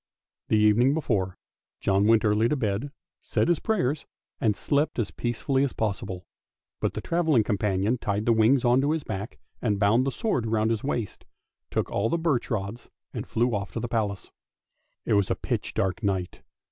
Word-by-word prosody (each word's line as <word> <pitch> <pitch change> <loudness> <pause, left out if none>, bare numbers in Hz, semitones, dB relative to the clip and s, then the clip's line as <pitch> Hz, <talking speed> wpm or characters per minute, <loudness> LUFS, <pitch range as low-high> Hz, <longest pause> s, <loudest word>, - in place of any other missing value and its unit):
The 110 - +3
evening 110 +6 +4
before, 100 - -1 0.4
John 100 +1 +2
went 115 0 +4
early 105 +2 +3
to - - +1
bed, 115 +2 -2 0.3
said - - 0
his 175 - +3
prayers, 155 - -1 0.3
and 105 -3 +2
slept 145 +6 0
as 115 -5 -1
peacefully 130 +3 0
as 140 - -1
possible; 100 -4 -3 0.5
but - - -1
the - - -3
travelling 160 -9 +2
companion 105 +2 0
tied 105 -1 -1
the 115 - +4
wings 115 +4 +4
on 120 +2 +4
to 145 +2 +2
his 160 -2 -2
back, 100 +1 -5 0.2
and 105 -4 0
bound 115 +6 +3
the - - +1
sword 130 - -1
round 110 0 +1
his 110 -2 -1
waist, 120 -7 -3 0.5
took - - -2
all 115 +3 0
the 170 - +1
birch 160 -7 0
rods, 110 0 -4 0.2
and - - -5
flew 120 +1 +1
off 100 -1 -3
to - - -2
the 120 - -3
Palace. 105 -4 -2 0.7
It - - +1
was 100 -2 +3
a - - +1
pitch - - -3
dark 95 +4 0
night. 95 -4 -2
115 Hz, 185 wpm, -26 LUFS, 100-130 Hz, 0.7 s, evening